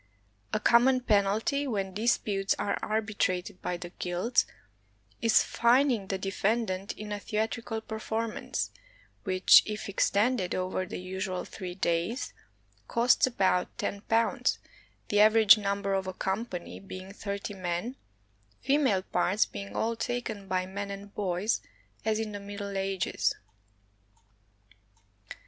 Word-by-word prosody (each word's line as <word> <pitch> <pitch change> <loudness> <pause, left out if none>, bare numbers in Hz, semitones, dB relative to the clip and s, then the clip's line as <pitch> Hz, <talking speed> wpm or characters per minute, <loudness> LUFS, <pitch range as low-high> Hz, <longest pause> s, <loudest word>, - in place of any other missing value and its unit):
A - - +1
common 255 +2 +5
penalty, 220 +6 +1
when 195 -6 -2
disputes 205 -2 +1
are 200 - 0
arbitrated 205 -3 -1
by 180 - -2
the 175 0 -8
guilds, 180 +7 +1 0.7
is 230 -1 +5
fining 240 -3 +3
the 190 - -1
de 195 +1 -3
fendant 200 -2 -1
in 210 0 -7
a 205 - -2
theatrical 220 +2 -2
performance, 220 0 -3 0.5
which, 185 -1 +7
if 215 0 -4
extended 200 0 +1
over 185 0 -2
the - - -5
usual 185 0 -4
three 180 -2 -7
days, 175 +7 -1 0.5
costs 240 +2 +4
about 190 -7 +1
£io, 230 +5 0 0.5
the 205 - +2
average 215 0 +7
number 200 -1 -1
of 190 -1 -1
a 185 - -3
company 190 -1 -3
being 190 0 -9
thirty 200 0 -5
men, 185 +6 -3 0.6
female 265 -8 +2
parts 190 +3 +2
being 200 0 -8
all 230 +1 0
taken 225 -4 -3
by 185 -1 0
men 200 +2 -5
and 200 0 -8
boys, 195 +2 0 0.4
as 220 -1 +1
in 220 -1 -3
the 205 - -5
Middle 200 0 -6
Ages. 195 -1 0
200 Hz, 125 wpm, -29 LUFS, 190-225 Hz, 0.7 s, which